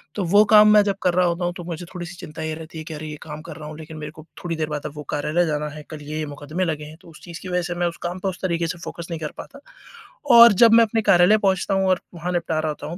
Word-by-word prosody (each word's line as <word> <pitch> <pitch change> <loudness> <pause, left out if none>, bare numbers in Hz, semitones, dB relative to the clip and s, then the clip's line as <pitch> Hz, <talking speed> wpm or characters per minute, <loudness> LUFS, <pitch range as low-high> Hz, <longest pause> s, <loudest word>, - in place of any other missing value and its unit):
तो 200 - -1
वो 205 +5 +5
काम 210 0 +7
मैं 210 - +7
जब 200 -1 -1
कर 180 - +2
रहा 180 - +3
होता 170 +1 -1
हूँ 175 - -1
तो 175 - -7
मुझे 175 0 -6
थोड़ी-सी 175 0 -7
चिंता 155 +1 -9
ये 155 0 -3
रहती 160 0 -10
है 160 - -6
कि 160 - -7
अरे 155 +1 -7
ये 150 - -7
काम 150 -1 -8
कर 165 -2 -9
रहा 150 -1 -8
हूँ 155 - -9
लेक़िन 160 0 -10
मेरे 150 0 -7
को 155 0 -14 0.2
थोड़ी 170 -1 -2
देर 155 -1 -2
बाद 150 -1 -5
अब 145 - -10
वो 150 - -7
कार्यालय 150 +4 0
जाना 150 -1 -2
है, 150 +1 -10
कल 155 -1 -8
ये 155 +1 -4
मुकदमे 145 +5 -4
लगे 150 -2 -3
हैं 155 +1 -12
तो 175 - -16
उस 155 - -16
चीज़ 170 -1 -9
की 185 - -8
वजह 180 0 0
से 175 0 -4
मैं 175 0 0
उस 170 - -6
काम 175 +2 -4
पे 195 - -3
उस 185 - -8
तरीक़े 170 -2 -1
से 175 +1 -5
फोकस 170 0 -8
नहीं 165 - -4
कर 150 - -4
पाता। 280 - -10 0.8
और 235 -2 +10
जब 230 -1 +7
मैं 230 0 +7
अपने 225 +1 -1
कार्यालय 180 +3 +5
पहुँचता 195 -1 0
हूँ 190 0 +1
और 185 - +2
वहाँ 175 +2 -4
निपटा 165 -2 -1
रहा 155 - -1
होता 150 - -6
हूँ 170 - -6
170 Hz, 320 wpm, -22 LUFS, 155-185 Hz, 0.8 s, और